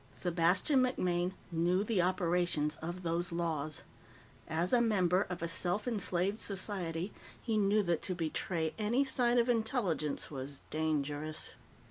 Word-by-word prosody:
Sebastian 180 - +2
MacMaine 180 -8 +1 0.2
knew 175 +3 +2
the 215 -4 +1
operations 175 -4 +1
of 175 +3 -6
those 170 +1 -1
laws. 160 -3 -2 0.6
As 165 +5 0
a 245 - +6
member 190 -4 +2
of 175 -2 -4
a - - 0
self 180 +5 0
enslaved 200 -2 0
society, 185 -2 -2 0.3
he 225 - -2
knew 210 0 +3
that 170 -4 0
to 185 - -2
betray 165 0 -2
any 235 +6 +2
sign 245 -2 +2
of 235 0 +4
intelligence 220 - 0
was 135 0 -7
dangerous. 155 -1 -2
180 Hz, 135 wpm, -33 LUFS, 165-210 Hz, 0.6 s, a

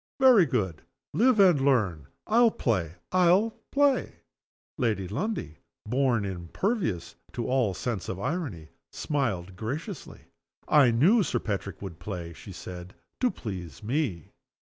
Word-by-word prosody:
Very 250 -10 +7
good. 95 - -1 0.3
Live 245 0 +4
and 180 -8 +6
learn. 100 - +1 0.2
I'll 235 +2 +5
play! 90 - -1 0.2
I'll 185 +5 +4 0.2
play!" 285 -1 +2 0.6
Lady 110 -7 0
Lundie 110 - -3 0.3
(born 125 -2 +1
impervious 95 - -2 0.2
to 120 - -3
all 125 -7 +1
sense 115 -2 -3
of 95 - -4
irony) 110 - -3 0.2
smiled 100 - -2
graciously. 140 - -6 0.5
"I 145 -5 +6
knew 165 - +4
Sir 185 - 0
Patrick 100 -2 -4
would 85 -4 -7
play," 85 -5 -6
she 115 -1 -11
said, 90 0 -9 0.2
"to 250 - +3
please 90 - -7
me." 115 - -2
115 Hz, 125 wpm, -27 LUFS, -, 0.6 s, Very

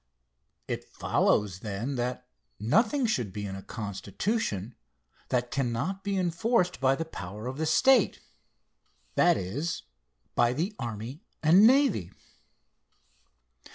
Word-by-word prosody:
It - - -3
follows, 100 -3 +1
then, 105 +6 -3
that 125 0 -3 0.3
nothing 225 - +2
should 125 - 0
be 105 +1 -5
in 95 -1 -5
a 95 - -7
constitution 105 - -3 0.6
that 125 -1 0
cannot 135 +9 -1
be 200 -1 -1
enforced 180 +2 +1
by 135 0 +3
the 165 - -3
power 105 - -7
of 130 +3 -5
the 160 - 0
state 250 +8 +4 0.9
that - - +4
is, 120 - -3 0.5
by 120 0 +3
the 175 - -2
army 120 - -5 0.2
and 180 +8 +7
navy. 260 - +3
130 Hz, 120 wpm, -28 LUFS, -, 0.9 s, and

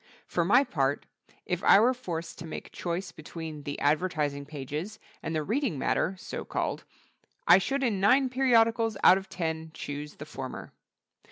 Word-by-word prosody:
For 170 - 0
my 240 +10 +5
part, 140 - -1 0.4
if 180 0 -2
I - - +7
were 245 +4 +4
forced 170 -10 -6
to 165 - -7
make 160 - -7
choice 175 +1 -4
between 160 -1 -8
the 145 0 -5
advertising 145 -2 0
pages 150 +8 -5 0.2
and 160 - -3
the 155 - 0
reading 225 - -1
matter 175 +7 0
(so - - -6
called), - - -3 0.6
I 175 +2 +8
should 270 +8 -1
in 220 -6 +1
nine 260 +8 +4
periodicals 230 -4 +3
out 185 - +8
of 190 0 -13
ten 160 -2 -3
choose 145 +1 -6
the 150 - -8
former. 135 -4 -7
175 Hz, 165 wpm, -28 LUFS, 150-220 Hz, 0.6 s, I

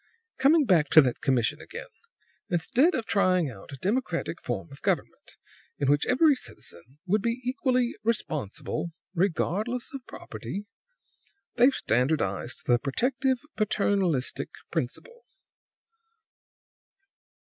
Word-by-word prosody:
"Coming 295 +3 +5
back 170 - +3
to 155 - +11
that 125 -4 -1
commission 125 -4 +1
again: - - -8 0.6
instead 240 - +2
of 230 - -2
trying 185 -8 +2
out 100 +1 -12
a - - -6
democratic 180 - -2
form 160 - -4
of 140 - -13
government, - - -2 0.4
in 140 -1 +2
which 145 0 +2
every 290 +4 +5
citizen 130 - -10
would 200 +3 +2
be 235 +3 -1
equally 250 -1 +1
responsible 160 - -2 0.2
regardless 200 - -1
of 275 -2 -6
property 120 - -7 0.9
they've 250 +3 +5
standardized 125 -3 0
the 120 -1 +4
protective, 255 - 0
paternalistic 195 - 0 0.2
principle." 470 - -4
185 Hz, 110 wpm, -27 LUFS, -, 0.9 s, to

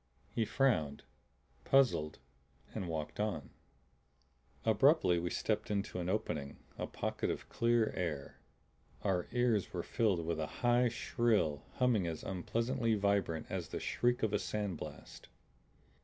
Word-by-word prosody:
He 115 - +1
frowned, 90 - +1 0.6
puzzled, 125 - +3 0.6
and 90 - -3
walked 80 +1 -4
on. 95 -11 -2 1.1
Abruptly 110 - +4
we 85 +1 -2
stepped - - -1
into 100 -3 -1
an 90 0 -2
opening, 75 -8 -2 0.2
a - - -3
pocket - - -2
of - - -3
clear 115 -1 +2
air. 80 -7 -3 0.6
Our 95 -3 +1
ears 120 -5 +1
were 90 -2 -2
filled 100 -8 +1
with 85 -1 -1
a 80 - -1 0.2
high, 120 0 +5
shrill 110 -11 +1
humming 120 -8 +2
as 80 -2 -4
unpleasantly 115 +5 0
vibrant 100 -6 +1
as - - -3
the - - -4
shriek 120 0 +1
of 110 -2 +1
a 105 - +2
sand 105 -5 -2
blast. - - -9
100 Hz, 135 wpm, -34 LUFS, 85-115 Hz, 1.1 s, high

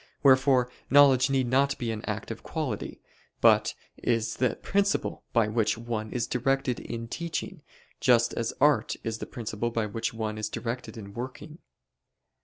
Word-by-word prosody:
Wherefore 130 -2 +5 0.2
knowledge 140 -2 +6
need 135 -1 +2
not 135 +3 +2
be 120 -2 -2
an 110 -1 -5
active - - -4
quality: - - -4 0.4
but - - +4 0.2
is 115 -1 0
the 130 0 +1
principle 200 0 0
by 115 -3 +3
which 110 0 +1
one 115 -2 -4
is 120 -1 -1
directed 130 0 0
in 115 0 -6
teaching, 170 +7 -4 0.4
just 120 -2 +4
as 115 -1 -1
art 150 0 +3
is 115 -1 -3
the - - -6
principle 115 -2 -3
by 115 -2 -1
which 115 +2 -3
one 110 -1 -4
is 110 0 -2
directed 120 +2 -5
in 100 -2 -9
working. 130 - -7
120 Hz, 155 wpm, -28 LUFS, 115-135 Hz, 0.4 s, knowledge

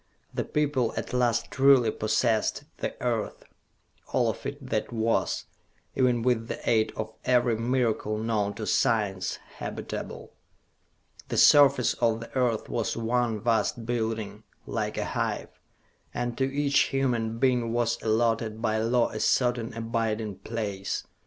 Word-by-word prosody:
The - - -1
people 145 -6 0
at - - -4
last 120 -2 +1
truly 135 -4 +5
possessed 110 +1 0
the - - -4
Earth - - -2 0.7
all 120 -3 +2
of 135 - -7
it 140 -2 -7
that 110 +1 -1
was, 115 -1 0 0.5
even 125 -3 +2
with 115 -2 +1
the - - -4
aid 110 -2 +3
of 110 0 -5
every 120 -2 +3
miracle 115 -2 0
known 105 -2 -1
to 110 - -5
science, 105 -8 +1 0.2
habitable. - - -6 1.0
The - - -2
surface 140 -4 +6
of 115 -2 +1
the 115 - -10
Earth 125 -4 +1
was 115 -1 -2
one 115 -1 0
vast 115 0 0
building, 110 -3 -2 0.2
like - - -3
a - - -1
hive, - - -2 0.7
and 120 -1 -2
to 135 0 0
each 140 0 +2
human 120 -4 0
being 125 -2 +2
was 120 -1 0
allotted 115 0 +1
by 110 -1 0
law 115 +2 +2
a 110 - -5
certain 120 -2 +1
abiding 115 -3 -2
place. 100 -2 -4
115 Hz, 140 wpm, -27 LUFS, 110-125 Hz, 1.0 s, surface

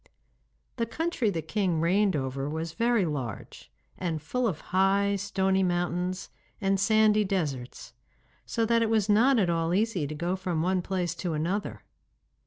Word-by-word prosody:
The 230 -1 -1
country 265 -1 -1
the 165 -5 -3
king 180 -1 0
reigned 190 +3 +2
over 135 0 -2
was 160 +2 -3
very 235 -2 +2
large, 135 -9 -6 0.3
and 170 -4 -2
full 240 +11 -1
of 165 -7 -2
high, 200 +2 +3
stony 190 -1 0
mountains 180 0 -1 0.3
and 195 -2 +1
sandy 215 +1 +4
deserts, 150 -11 -3 0.5
so 230 -1 -1
that 230 +1 +2
it 225 - +1
was 220 -2 +1
not 240 +6 +5
at 185 -6 +2
all 165 +1 0
easy 200 -7 0
to 155 - -6
go 170 +4 -1
from 180 -4 -2
one 185 +1 +1
place 180 -2 -2
to 175 -1 -3
another. 155 - -2
185 Hz, 160 wpm, -28 LUFS, 165-210 Hz, 0.5 s, not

